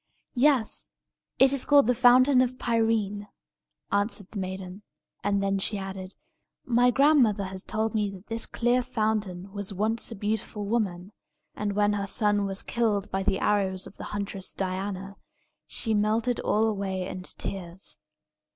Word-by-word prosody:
"Yes; 255 -3 +2 0.5
it 265 0 +6
is 275 - +2
called 285 -1 +5
the 250 - +3
Fountain 255 +2 +6
of 255 0 0
Pirene," 225 -4 0 0.6
answered 205 -1 -1
the 210 - -5
maiden; 190 +1 -5 0.4
and 200 -1 +1
then 195 0 +1
she 205 +2 0
added, 190 -1 -6 0.5
"My 245 -1 +4
grandmother 255 -6 +4
has 190 0 -6
told 220 +1 -1
me 210 -2 +1
that 195 0 -11
this 225 0 -2
clear 245 +1 +1
fountain 215 -6 -2
was 200 -1 -4
once 220 +4 -1
a - - -5
beautiful 210 0 -3
woman; 200 -4 -1 0.4
and 205 -1 -2
when 205 0 +2
her 200 -1 -2
son 205 0 +1
was 195 0 -3
killed 215 -4 0
by 195 - 0
the 195 0 +1
arrows 190 -3 0
of 195 - -13
the - - -7
huntress 200 -2 -5
Diana, 195 +1 -4 0.5
she 225 - -1
melted 220 +3 +1
all 215 +1 +2
away 195 -4 -2
into 185 -1 -7
tears. 185 -1 -5
205 Hz, 155 wpm, -27 LUFS, 195-230 Hz, 0.6 s, it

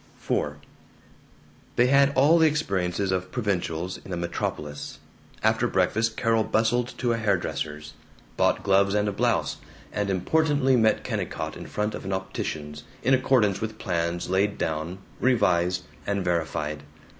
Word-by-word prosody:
IV 75 0 0 1.2
They 120 - +5
had 140 +2 +5
all 150 +6 +5
the 160 - +6
experiences 100 - 0
of 95 0 -2
provincials 90 -6 -2
in - - -10
a 90 - -2
metropolis. 75 -4 -4 0.5
After - - +3
breakfast 110 +1 +1
Carol 115 -2 +2
bustled 120 +3 0
to 120 -2 +1
a - - -1
hair 105 -4 +2
dresser's, 75 -3 -5 0.4
bought - - +2
gloves 100 +1 +3
and 105 0 +2
a - - +1
blouse, 100 - 0 0.4
and 105 0 -1
importantly 135 - +2
met 110 -3 +3
Kennicott - - -3
in - - -8
front 105 +1 -2
of - - -6
an 95 0 -3
optician's, 75 -6 -4 0.2
in 130 +3 +3
accordance 125 -6 +3
with 110 -1 -4
plans 85 -2 -2
laid 100 +3 +1
down, 80 +3 -2 0.2
revised, 90 -7 +2 0.2
and 100 -2 -1
verified. 80 -3 -1
100 Hz, 145 wpm, -26 LUFS, 90-115 Hz, 1.2 s, the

